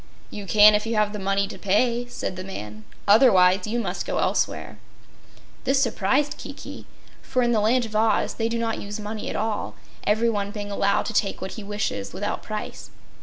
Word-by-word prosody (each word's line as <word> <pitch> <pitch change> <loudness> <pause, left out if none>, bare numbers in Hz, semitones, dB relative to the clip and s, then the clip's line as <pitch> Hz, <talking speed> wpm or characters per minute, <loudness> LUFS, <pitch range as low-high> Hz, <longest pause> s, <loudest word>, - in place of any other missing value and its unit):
"You 205 -2 -7
can 210 +2 +7
if 210 +1 0
you 230 - -1
have 210 -1 +1
the 210 - -4
money 195 +1 0
to - - -9
pay," 235 +5 +1
said 245 - -5
the 185 - -6
man, 105 - -8 0.2
"otherwise 195 -4 +5
you 235 +3 -1
must - - -3
go - - -3
elsewhere." - - -1 0.8
This 270 0 +2
surprised 275 +4 +1
Kiki, - - -9 0.3
for 255 -1 0
in 240 - +2
the 220 -3 +2
Land 240 +3 +2
of 215 -1 -8
Oz 220 0 +2
they 225 0 -1
do 235 - -1
not 230 -1 -2
use 205 +1 -6
money 210 +1 -5
at - - -4
all, 215 -1 -2 0.3
everyone 210 -1 +1
being 205 -1 -6
allowed 200 0 +1
to 225 - -4
take 200 -2 0
what 190 - -5
he 220 - -7
wishes 200 - -3
without - - -3
price. - - -6
210 Hz, 195 wpm, -24 LUFS, 200-230 Hz, 0.8 s, can